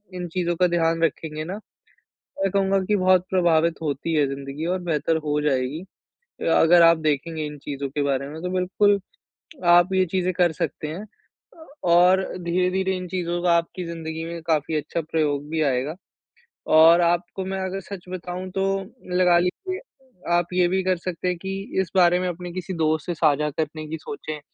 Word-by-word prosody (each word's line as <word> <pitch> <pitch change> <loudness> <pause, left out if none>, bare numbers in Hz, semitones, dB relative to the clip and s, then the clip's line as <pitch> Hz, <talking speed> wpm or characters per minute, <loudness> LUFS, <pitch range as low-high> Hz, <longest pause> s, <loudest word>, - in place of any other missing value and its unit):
इन 180 -1 -4
चीज़ों 175 0 -1
का 180 - +4
ध्यान 165 -1 +1
रखेंगे 155 -1 -2
ना, 180 - -5 0.7
मैं 195 0 -3
कहूँगा 195 0 +2
कि 210 - +1
बहुत 185 -2 +3
प्रभावित 170 -3 +3
होती 150 +2 -2
है 150 -2 +3
ज़िन्दगी 140 +3 -5
और - - -3
बेहतर 160 -1 0
हो 150 0 +1
जाएगी। 140 +1 0 0.6
अ - - +1
अगर 170 +1 +6
आप 165 0 +6
देखेंगे 155 +2 -1
इन 150 0 -8
चीज़ों 140 0 -5
के 145 +2 -2
बारे 140 -1 -1
में 155 +2 -8
तो 180 - -3
बिल्कुल 190 +2 +2 0.7
आप 175 +2 +5
ये 190 0 +3
चीज़ें 185 -1 +1
कर 175 -1 +3
सकते 155 - -3
हैं। 165 +7 -6
अ 320 +8 -20 0.3
और 180 +2 +6 0.2
धीरे-धीरे 185 +2 0
इन 180 0 -6
चीज़ों 175 -1 -2
का 175 -1 +4
आपकी 170 +2 -3
ज़िन्दगी 160 -1 -5
में 170 0 -6
काफ़ी 155 -1 +1
अच्छा 155 +2 -2
प्रयोग 150 -2 -1
भी 160 0 -1
आएगा। 130 +5 -2 0.8
और 165 +2 +7
आपको 175 +2 0
मैं 190 0 -3
अगर 190 +1 -3
सच 195 -1 -9
बताऊँ 185 0 -5
तो 195 - +2 0.5
लगा 180 -1 +5
लीजिए 370 - -2 0.6
आप 175 0 0
ये 180 -1 +3
भी 190 +1 0
कर 185 -1 +1
सकते 175 0 -4
हैं 180 - -2
कि 190 +3 -5 0.3
इस 185 -3 -5
बारे 180 -1 +5
में 185 - -1
अपने 175 0 -6
किसी 185 +1 -5
दोस्त 155 0 +1
से 175 - -1
साझा 150 -2 +2
करने 155 0 -3
की 160 - -4
सोचें 155 -3 -7
170 Hz, 185 wpm, -23 LUFS, 155-185 Hz, 0.8 s, और